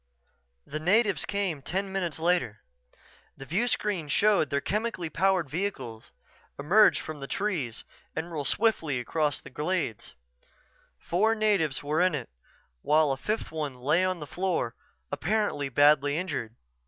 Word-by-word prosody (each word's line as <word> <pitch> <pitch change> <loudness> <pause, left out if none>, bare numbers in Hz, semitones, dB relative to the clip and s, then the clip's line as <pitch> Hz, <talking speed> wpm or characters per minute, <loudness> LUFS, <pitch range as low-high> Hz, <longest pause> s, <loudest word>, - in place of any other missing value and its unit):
The 155 - -5
natives 195 0 +2
came 195 -8 -2
ten 190 +7 -3
minutes 180 -6 -2
later. 165 -10 0 0.7
The 135 - -9
viewscreen 200 - 0
showed 200 +1 +3
their 140 - +1
chemically 205 - -2
powered 190 -1 +2
vehicle 135 - -4 0.6
emerge 190 +10 +5
from 155 -1 -7
the 135 - -6
trees 165 - -2 0.3
and 170 +2 -4
roll 155 -3 -3
swiftly 160 - +1
across 150 +3 0
the - - -12
glade. 155 - -2 0.9
Four 215 +6 +1
natives 200 -11 +1
were 150 +3 +1
in 180 -3 +3
it 130 -5 -5 0.5
while 155 -1 +3
a - - +1
fifth 215 +11 -3
one 150 -4 -3
lay 145 +8 +2
on 185 -1 0
the 150 - -6
floor, 175 -8 -1 0.4
apparently 165 -3 0
badly 145 +2 +4
injured. 135 -11 -3
160 Hz, 140 wpm, -28 LUFS, 145-195 Hz, 0.9 s, emerge